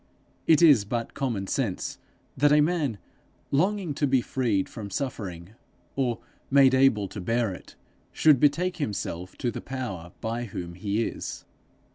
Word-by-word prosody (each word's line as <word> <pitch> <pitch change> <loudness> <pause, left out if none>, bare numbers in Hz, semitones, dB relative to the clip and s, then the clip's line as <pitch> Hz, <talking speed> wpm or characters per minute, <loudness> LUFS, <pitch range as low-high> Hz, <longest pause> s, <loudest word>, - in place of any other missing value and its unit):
It 160 +1 +6
is 145 -10 +7
but 115 +3 -3
common 120 -8 -2
sense 105 -2 -2 0.4
that 145 +2 +4
a 150 - +6
man, 150 - +1 0.5
longing 185 +2 +1
to 145 +1 0
be 130 -1 +3
freed 115 -6 0
from 105 -3 -8
suffering, 95 -7 -5 0.4
or 125 -4 0 0.3
made 135 -1 +6
able 130 -7 +4
to 105 - -7
bear 115 +1 0
it, - - -12 0.4
should 150 -5 +5
betake 175 +6 +2
himself 100 - -4
to 120 - -1
the - - -6
Power 110 -10 -5
by 115 +1 -3
whom 90 -5 -6
he 100 +5 -1
is. - - -5
120 Hz, 150 wpm, -26 LUFS, 100-140 Hz, 0.5 s, is